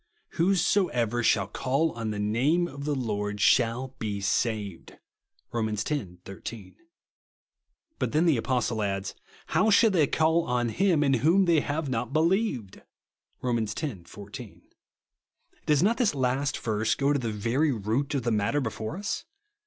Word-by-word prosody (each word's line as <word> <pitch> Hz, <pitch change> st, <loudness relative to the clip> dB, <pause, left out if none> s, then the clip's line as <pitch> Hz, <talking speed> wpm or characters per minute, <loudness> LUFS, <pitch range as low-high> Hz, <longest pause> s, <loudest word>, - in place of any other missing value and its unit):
*' -, -, -47 dB
Whosoever 165 Hz, -, +2 dB
shall 110 Hz, -4 st, +3 dB
call 135 Hz, +9 st, 0 dB
on 115 Hz, -1 st, -4 dB
the 105 Hz, -, -3 dB
name 130 Hz, +12 st, +1 dB
OF 140 Hz, -2 st, -8 dB
THE 150 Hz, -1 st, 0 dB
Lord 105 Hz, -5 st, -2 dB
shall 120 Hz, +4 st, +3 dB
be 105 Hz, -2 st, -3 dB
saved;' 100 Hz, -3 st, -2 dB, 0.5 s
(Rom. 115 Hz, -2 st, -1 dB
x. 105 Hz, 0 st, -2 dB
13). 100 Hz, -, -6 dB, 1.2 s
But -, -, -1 dB
then 155 Hz, +3 st, +2 dB
the 165 Hz, -4 st, +4 dB
Apostle 120 Hz, -2 st, -1 dB
adds, 100 Hz, -1 st, -2 dB, 0.3 s
"How 220 Hz, -, +2 dB
shall 220 Hz, +1 st, +5 dB
they 160 Hz, -7 st, +3 dB
call 160 Hz, +3 st, +2 dB
on 120 Hz, -1 st, 0 dB
him 175 Hz, -, +2 dB
in 140 Hz, -, +2 dB
tvJiom 165 Hz, +10 st, +4 dB
they 170 Hz, -3 st, +4 dB
have 145 Hz, +1 st, -2 dB
not 125 Hz, 0 st, -3 dB
believed?" 160 Hz, -, 0 dB, 0.6 s
(Rom. 120 Hz, -2 st, +1 dB
x. 110 Hz, -1 st, -3 dB, 0.3 s
14.) 105 Hz, +3 st, -10 dB, 1.0 s
Does 150 Hz, 0 st, +3 dB
not 225 Hz, +4 st, +2 dB
this 235 Hz, -, +1 dB
last 135 Hz, +1 st, 0 dB
verse 110 Hz, 0 st, 0 dB
go 140 Hz, +1 st, +1 dB
to 145 Hz, -, +1 dB
the 115 Hz, -3 st, -2 dB
very 120 Hz, +9 st, +1 dB
root 120 Hz, +6 st, -1 dB
of 135 Hz, -, -1 dB
the 120 Hz, -, 0 dB
matter 105 Hz, +7 st, +1 dB
before 115 Hz, +3 st, -4 dB
us 205 Hz, +9 st, -3 dB
125 Hz, 155 wpm, -27 LUFS, 110-155 Hz, 1.2 s, shall